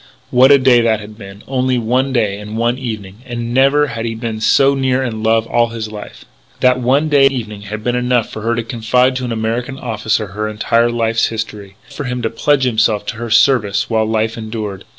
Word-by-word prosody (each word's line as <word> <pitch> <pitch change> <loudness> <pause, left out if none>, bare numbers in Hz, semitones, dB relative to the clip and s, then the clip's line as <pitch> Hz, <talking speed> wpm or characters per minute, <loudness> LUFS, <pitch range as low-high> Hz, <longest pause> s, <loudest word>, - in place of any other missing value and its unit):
What 130 +2 +6
a 140 - +8
day 130 -2 +4
that 115 -2 +1
had 105 0 -11
been.... 100 -1 -12
Only 130 -1 0
one 125 +4 0
day 105 -5 0
and 105 +1 -7
one 120 +2 0
evening.... 105 -6 -6
And 120 -2 -5
never 140 +3 +4
had 120 -4 -5
he 115 -1 -3
been 110 -1 -5
so 135 +5 +4
near 130 -1 0
in 110 -4 -4
love 110 0 +2
in - - -14
all 120 0 +3
his 115 -2 -6
life.... 105 -1 -10 0.3
That 125 0 +3
one 135 +5 +2
day 145 -2 +4
and - - 0
evening 105 -6 -6
had 105 +1 -7
been 120 +1 0
enough 125 -1 +1
for 110 - -8
her 115 +2 0
to 115 - -2
confide 125 +3 +1
to 130 - -3
an 120 - -4
American 115 +4 -3
officer 110 -3 -2
her 105 +3 -4
entire 115 +2 +1
life's 115 -1 +1
history.... 105 -3 -6
Enough 145 - -16
for - - -3
him 125 0 -3
to 115 - -1
pledge 140 +4 +1
himself 110 -4 +1
to 110 - -5
her 120 0 -5
service 110 -3 +2
while 110 -1 +2
life 110 +1 -1
endured.... 110 -3 -6
115 Hz, 230 wpm, -16 LUFS, 110-125 Hz, 0.3 s, a